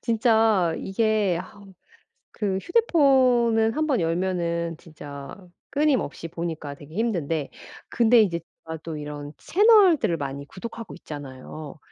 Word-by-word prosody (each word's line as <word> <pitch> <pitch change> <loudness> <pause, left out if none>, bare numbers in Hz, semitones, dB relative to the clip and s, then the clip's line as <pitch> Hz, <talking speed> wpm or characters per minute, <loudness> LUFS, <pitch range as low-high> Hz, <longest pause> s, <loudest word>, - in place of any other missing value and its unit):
진짜 220 -7 +2
이게 205 -3 +1
아 185 +2 -12 0.7
그 200 -3 -2
휴대폰은 255 - +3
한번 305 -7 +1
열면은 170 -1 -1
진짜 145 -4 -10 0.4
끊임없이 275 - 0
보니까 165 -4 -5
되게 145 +3 -14
힘든데 165 -9 -1 0.4
근데 235 0 +5
이제 175 -5 +1 0.2
제가 160 0 -6
또 165 -1 -6
이런 145 0 -7
채널들을 370 - +4
많이 140 -2 -5
구독하고 230 +5 -8
있잖아요. 145 -1 -9
185 Hz, 260 characters per minute, -24 LUFS, 160-235 Hz, 0.7 s, 근데